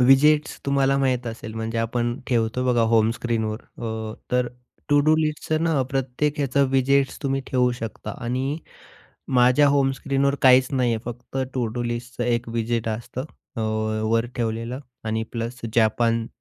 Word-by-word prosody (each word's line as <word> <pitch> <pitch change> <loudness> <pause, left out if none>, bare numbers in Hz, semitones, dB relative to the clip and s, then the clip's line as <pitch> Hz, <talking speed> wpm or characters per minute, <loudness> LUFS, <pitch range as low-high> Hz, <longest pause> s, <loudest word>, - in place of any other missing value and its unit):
Visits 150 +4 +5
तुम्हाला 135 0 +3
माहीत 125 -2 +1
असेल, 115 -1 -6
म्हणजे 110 +1 -3
आपण 120 +2 -1
ठेवतो 120 +1 0
बघा 120 -2 +3
होम 110 0 +4
स्क्रीनवर 110 -2 -1 0.2
अ, 110 -1 -4 0.2
तर 125 -1 +2 0.4
टू 145 0 +5
डू 155 - +6
लिस्टचं 155 0 0
ना, 155 -5 +2
प्रत्येक 135 +3 -1
ह्याचं 140 0 +2
व्हिजिट्स 135 +1 +2
तुम्ही 135 0 0
ठेवू 125 -1 +2
शकता. 115 -2 -6
आणि 130 +5 -1 0.8
माझ्या 125 +4 +5
होम 140 -1 +3
स्क्रीनवर 140 +1 0
काहीच 130 -1 +7
नाही 125 -2 +2
आहे - - -2
फक्त 125 +2 -7 0.2
टू 125 -2 0
डू 120 - -1
लिस्टचं 120 +1 -4
एक 120 -1 0
व्हिजिट 115 0 -1
असतं. 120 +4 -4 0.3
अ, - - -2 0.5
वर 115 +1 +2
ठेवलेलं 115 +2 -2 0.2
आणि 110 0 -1
प्लस 120 +1 -4
जापान 115 0 +2
125 Hz, 155 wpm, -24 LUFS, 115-135 Hz, 0.8 s, काहीच